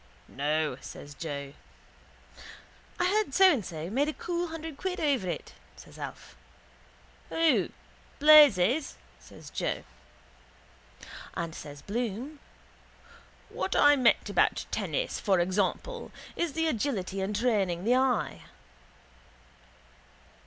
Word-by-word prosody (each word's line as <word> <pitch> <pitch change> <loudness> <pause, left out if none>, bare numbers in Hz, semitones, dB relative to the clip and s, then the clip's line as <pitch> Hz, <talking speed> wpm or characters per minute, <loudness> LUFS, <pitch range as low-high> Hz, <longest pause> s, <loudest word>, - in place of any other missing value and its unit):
—No, 150 0 -1
says 145 - -10
Joe. 140 -3 -6 1.5
—I 355 - +2
heard 400 -6 +1
So 385 -1 +7
and 245 -8 -2
So 160 -2 -6
made 275 +6 +1
a - - -3
cool 350 +2 -3
hundred 325 -2 -7
quid 375 0 -3
over 270 - +1
it, - - -5 0.2
says - - -14
Alf. - - -8 0.9
—Who? 325 -1 +2 0.5
Blazes? 285 - +6 0.2
says - - -14
Joe. - - -2 1.5
And 170 -1 -3
says 145 -2 -10
Bloom: 240 +6 -4 1.1
—What - - -3
I 290 0 +6
meant 255 -4 +3
about - - +1
tennis, - - -2
for 190 -3 +2
example, 200 - -1 0.2
is 340 -4 -1
the 325 +2 0
agility 210 -8 -2
and 200 +2 -2
training 200 -7 0
the 235 +4 +3
eye. 260 -1 +1
245 Hz, 110 wpm, -29 LUFS, -, 1.5 s, So